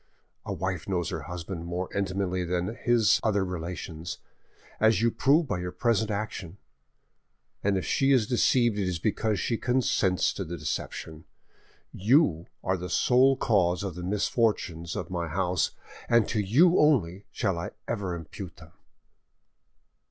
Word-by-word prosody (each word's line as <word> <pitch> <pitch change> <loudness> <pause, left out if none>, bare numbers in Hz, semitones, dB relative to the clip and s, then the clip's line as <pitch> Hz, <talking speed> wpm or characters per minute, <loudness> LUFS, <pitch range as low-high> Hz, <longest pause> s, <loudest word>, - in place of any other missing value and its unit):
A - - -2
wife 95 -2 -3
knows 85 -3 0
her - - -4
husband 90 0 -6
more 90 +1 -3
intimately 95 -2 -1
than 90 +4 -2
his 120 -2 +3
other 100 -3 +1
relations, 85 -1 -5 0.6
as 110 0 +4
you 115 +1 +2
prove 150 +8 +3
by 120 - -2
your 90 0 -4
present 110 -1 +1
action, 100 -3 -4 1.1
and 100 -1 +2
if 95 - -3
she 135 0 +2
is 125 -5 +4
deceived 120 -2 +2
it 95 - 0
is 90 -2 -1
because 105 +3 0
she 115 +5 -1
consents 120 -7 +1
to 95 - -4
the 85 0 -6
deception. 80 -1 -5 0.7
You 100 - +3 0.2
are 95 0 0
the 90 +1 -6
sole 130 +7 +4
cause 90 -7 +2
of 95 -2 -3
the 90 - -7
misfortunes 95 -4 -1
of - - -5
my 85 -2 -2
house, 90 +2 0 0.4
and 115 -2 +4
to 110 - 0
you 145 - +4
only 100 - +2
shall 95 -7 -1
I 85 - -4 0.2
ever 95 -4 -2
impute 85 +2 -8
them." 80 +1 -15
95 Hz, 150 wpm, -27 LUFS, 90-115 Hz, 1.1 s, as